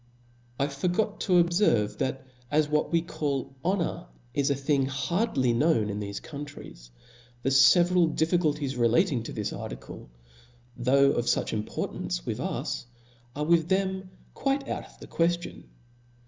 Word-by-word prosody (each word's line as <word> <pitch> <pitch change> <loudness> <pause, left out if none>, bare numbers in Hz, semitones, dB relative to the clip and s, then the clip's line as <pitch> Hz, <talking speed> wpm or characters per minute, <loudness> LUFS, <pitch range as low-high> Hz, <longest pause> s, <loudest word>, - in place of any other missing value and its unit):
I 140 - +3
forgot 180 +9 -1
to 190 - +1
obferve, 170 - +3
that 130 0 -2 0.2
as 150 +2 +2
what 150 0 0
we 165 -1 +2
call 140 -6 -3
honor. 180 - -1 0.3
h 140 0 +1
a 140 - +2
thing 135 0 +1
hardly 135 - 0
known 115 -5 +2
in 100 - -4
thofc 100 -1 -5
countries, 140 - -9 0.5
the 135 - +1
fe 135 +6 +7
veral 175 -2 +2
diifeculties 150 -5 0
relating 120 - +3
to 115 - -7
this 105 -2 -3
article, - - -8 0.7
though 140 +3 +4
of 120 - -1
fuch - - 0
importance 105 - -3
with - - -3
us, - - -3 0.5
are 150 +1 -2
with 170 0 +3
them 190 -1 0 0.2
quite 275 0 -1
out - - -4
of - - -20
the - - -10
queftion. 175 +1 -1
145 Hz, 150 wpm, -27 LUFS, 125-175 Hz, 0.7 s, fe